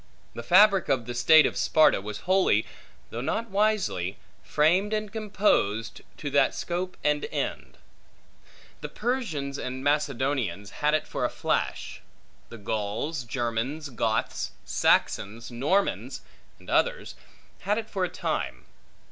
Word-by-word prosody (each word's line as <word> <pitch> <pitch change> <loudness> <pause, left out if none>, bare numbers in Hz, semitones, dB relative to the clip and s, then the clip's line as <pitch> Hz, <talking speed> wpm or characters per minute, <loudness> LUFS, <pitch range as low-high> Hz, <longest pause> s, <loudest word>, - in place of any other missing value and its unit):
The - - -6
fabric 190 - +5
of 130 -4 +1
the 120 - -5
state 155 +6 +6
of - - -1
Sparta 155 -10 +4
was 105 +1 -6
wholly 185 - +3 0.5
(though 115 - -4
not 225 - -2
wisely) 180 - 0 0.3
framed 180 +8 +2
and 215 -1 -2
composed, 195 - 0 0.2
to 145 -2 -5
that 140 - +3
scope 180 +1 -3
and 150 0 +1
end. - - -4 1.0
The - - -5
Persians 180 - -2
and 130 +1 -5
Macedonians 135 - 0
had 150 +1 +3
it 155 - -1
for - - -4
a - - +2
flash. - - -2 0.5
The 115 - -9
Gauls, 110 +7 -3
Germans, 120 +5 -3
Goths, 115 -3 -1
Saxons, 115 +5 +1
Normans, 150 +12 0 0.4
and - - -19
others, - - 0 0.5
had 210 +2 0
it 225 -1 -3
for 195 -4 -2
a 180 - 0
time. - - -3
145 Hz, 130 wpm, -27 LUFS, 115-190 Hz, 1.0 s, state